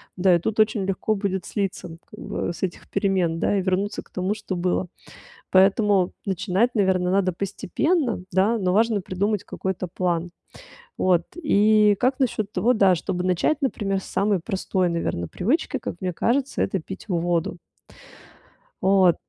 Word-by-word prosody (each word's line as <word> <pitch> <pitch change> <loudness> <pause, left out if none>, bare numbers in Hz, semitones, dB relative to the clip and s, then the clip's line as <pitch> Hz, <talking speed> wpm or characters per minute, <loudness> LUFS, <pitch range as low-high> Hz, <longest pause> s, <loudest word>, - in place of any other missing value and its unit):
Да, 185 0 +4
и - - +2
тут 215 +5 -3
очень 215 -2 +1
легко 195 +3 -1
будет 195 -3 -2
слиться, 195 -3 -3
ну, 165 - -10
как - - -13
бы, 170 - -3
с - - -9
этих 180 -2 -4
перемен, 190 -5 0
да, 205 - +1
и 195 - +1
вернуться 195 +3 -1
к - - -26
тому, 185 +2 -1
что 210 -3 -5
было. 180 +1 0 0.6
Поэтому 195 0 +4
начинать, 200 +5 0
наверно, 185 -3 +2
надо 190 -1 +2
постепенно, 235 - -1
да, 195 +6 +2
но 185 -2 0
важно 230 +2 +3
придумать 200 +2 -1
какой-то 190 -1 -4
план. 175 -1 -2 0.7
Вот, 180 -2 +3
и 215 -9 +4
как 260 +2 +1
насчет 215 -5 -1
того, 225 +6 +2
да, 195 -4 +5
чтобы 180 +1 -3
начать, 185 - +1
например, 195 -7 -1
с - - -12
самой 200 -1 0
простой, 185 -1 -1
наверно, 165 - -2
привычки, 270 - -1
как 225 - -6
мне 185 -1 -1
кажется- 260 +9 0
это 190 - -1
пить 190 +6 -9
воду? 170 -2 0 1.3
Вот. 190 -3 +4
190 Hz, 160 wpm, -24 LUFS, 180-210 Hz, 1.3 s, да